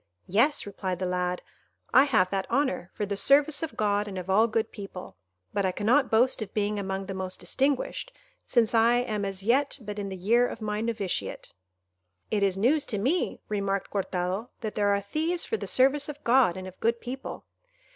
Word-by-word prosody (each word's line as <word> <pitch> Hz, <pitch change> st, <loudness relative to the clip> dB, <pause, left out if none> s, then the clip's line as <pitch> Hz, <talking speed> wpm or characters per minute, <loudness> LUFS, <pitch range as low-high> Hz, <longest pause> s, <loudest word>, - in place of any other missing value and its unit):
"Yes," 235 Hz, -, +2 dB
replied 190 Hz, -2 st, -4 dB
the 185 Hz, -, -2 dB
lad, 180 Hz, 0 st, -1 dB, 0.5 s
"I 265 Hz, +2 st, +7 dB
have 200 Hz, -10 st, +2 dB
that 195 Hz, -1 st, -2 dB
honour, 240 Hz, -9 st, 0 dB
for 210 Hz, -, -3 dB
the 200 Hz, 0 st, -3 dB
service 280 Hz, +8 st, +4 dB
of 325 Hz, -, -5 dB
God 205 Hz, 0 st, +1 dB
and 195 Hz, -2 st, -6 dB
of 185 Hz, +1 st, -4 dB
all 220 Hz, +4 st, +5 dB
good 220 Hz, 0 st, -1 dB
people; 195 Hz, -3 st, -9 dB, 0.4 s
but 200 Hz, -, 0 dB
I 190 Hz, -, +1 dB
cannot 245 Hz, +8 st, +2 dB
boast 235 Hz, +2 st, +3 dB
of 205 Hz, -3 st, -6 dB
being 210 Hz, 0 st, 0 dB
among 195 Hz, 0 st, -3 dB
the 195 Hz, -, -5 dB
most 190 Hz, -1 st, -5 dB
distinguished, 280 Hz, -, -1 dB, 0.3 s
since 235 Hz, -2 st, +2 dB
I 230 Hz, +1 st, +5 dB
am 220 Hz, -5 st, -1 dB
as 195 Hz, -1 st, -4 dB
yet 270 Hz, +7 st, +2 dB
but 210 Hz, -3 st, -6 dB
in 200 Hz, -1 st, -4 dB
the 190 Hz, -, -6 dB
year 235 Hz, +7 st, +3 dB
of -, -, -7 dB
my 210 Hz, -1 st, -2 dB
novitiate." 220 Hz, -5 st, -3 dB, 0.8 s
"It 210 Hz, -, +1 dB
is 195 Hz, -1 st, +2 dB
news 275 Hz, +9 st, +3 dB
to 210 Hz, -, -2 dB
me," 275 Hz, -, 0 dB
remarked 200 Hz, -2 st, -2 dB
Cortado, 190 Hz, +2 st, -2 dB
"that 215 Hz, -2 st, -3 dB
there 205 Hz, -1 st, +2 dB
are 200 Hz, 0 st, +1 dB
thieves 320 Hz, -, -2 dB
for 445 Hz, -, -1 dB
the -, -, -6 dB
service 275 Hz, +3 st, +3 dB
of 295 Hz, 0 st, -8 dB
God 235 Hz, -7 st, +4 dB
and 185 Hz, 0 st, -6 dB
of 185 Hz, -, -12 dB
good 230 Hz, +1 st, +1 dB
people." 255 Hz, +3 st, -7 dB
210 Hz, 200 wpm, -27 LUFS, 195-250 Hz, 0.8 s, I